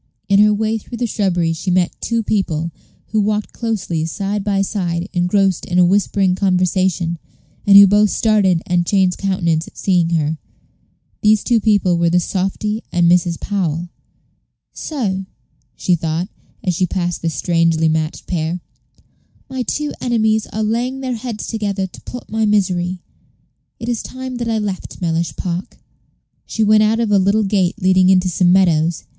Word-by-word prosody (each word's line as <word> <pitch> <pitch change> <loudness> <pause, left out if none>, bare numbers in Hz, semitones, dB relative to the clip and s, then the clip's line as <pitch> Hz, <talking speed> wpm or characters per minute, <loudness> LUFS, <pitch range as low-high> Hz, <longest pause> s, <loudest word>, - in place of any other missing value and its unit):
In 200 0 +4
her 210 0 +6
way 220 +1 0
through 235 +3 -9
the 245 - -1
shrubbery 180 -7 0
she 170 +4 -4
met 180 -1 +1
two 230 -1 -1
people, 170 -6 -1 0.4
who 215 - +1
walked 210 0 -1
closely 195 -8 -2
side 200 +4 -3
by 195 -1 +1
side, 180 -4 -2
engrossed 185 +1 +1
in 175 - -1
a 180 - +6
whispering 195 0 +2
conversation, 185 -2 0 0.5
and 200 0 +8
who 200 - +10
both 205 +2 +4
started 195 -7 +2
and 175 -1 0
changed 190 -3 +2
countenance 170 -5 0
at - - -16
seeing 180 -4 +1
her. 160 -2 -1 0.8
These 210 -1 +3
two 235 -2 +2
people 200 -5 +2
were 170 0 +3
the 175 +1 +3
softy 195 +4 -2
and 175 -1 +2
Mrs. 175 -1 +2
Powell. 175 -4 -2 0.8
"So," 195 -11 -3 0.5
she 180 - 0
thought, 165 +2 -1 0.3
as 185 -4 0
she 180 +2 0
passed 175 -1 -2
this 165 -2 -2
strangely 165 -2 +1
matched 155 0 -2
pair, 170 0 -2 0.9
"my 260 -1 -3
two 295 +4 -2
enemies 220 -3 +1
are 220 - -3
laying 245 +5 -1
their 260 -1 -2
heads 230 -2 -5
together 205 -3 -2
to 185 - -12
plot 245 - -9
my 220 0 0
misery. 185 -3 0 0.8
It 230 - -6
is 240 -2 -1
time 260 -1 -7
that 235 -1 -3
I 225 - 0
left 205 -3 -4
Mellish 165 -1 -1
Park." 180 0 -4 0.7
She 220 - -1
went 215 0 +5
out 215 +1 +2
of 230 -3 0
a 200 - +5
little 200 +3 +2
gate 195 -1 0
leading 185 -1 +4
into 185 -1 +3
some 175 +1 +2
meadows. 170 -3 +2
190 Hz, 165 wpm, -18 LUFS, 175-215 Hz, 0.9 s, who